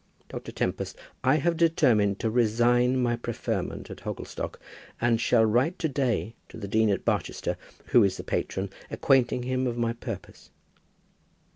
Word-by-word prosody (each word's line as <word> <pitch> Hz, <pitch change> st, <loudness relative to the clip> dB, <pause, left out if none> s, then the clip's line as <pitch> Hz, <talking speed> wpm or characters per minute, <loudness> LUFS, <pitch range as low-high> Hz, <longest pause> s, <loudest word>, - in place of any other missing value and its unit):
Dr. -, -, -7 dB
Tempest, -, -, -2 dB, 0.3 s
I 130 Hz, +3 st, +4 dB
have 170 Hz, +3 st, +1 dB
determined 120 Hz, -12 st, +3 dB
to 115 Hz, -2 st, 0 dB
resign 120 Hz, +2 st, +3 dB
my 120 Hz, -1 st, +2 dB
preferment 120 Hz, -1 st, -4 dB
at -, -, -8 dB
Hogglestock, -, -, -5 dB, 0.4 s
and 115 Hz, -1 st, +2 dB
shall 115 Hz, -2 st, +4 dB
write 125 Hz, -, +2 dB
to 160 Hz, -, 0 dB
day 130 Hz, -6 st, -1 dB, 0.2 s
to -, -, -10 dB
the 100 Hz, -, -5 dB
Dean 110 Hz, +2 st, +3 dB
of 100 Hz, -, -1 dB
Barchester, -, -, -1 dB, 0.3 s
who 120 Hz, -, +6 dB
is 100 Hz, -2 st, +1 dB
the -, -, -6 dB
patron, 95 Hz, 0 st, -2 dB, 0.2 s
acquainting 125 Hz, -2 st, +2 dB
him 130 Hz, +1 st, 0 dB
of 120 Hz, -1 st, -2 dB
my 115 Hz, -1 st, 0 dB
purpose." 115 Hz, -, -8 dB
120 Hz, 155 wpm, -27 LUFS, 110-130 Hz, 0.4 s, who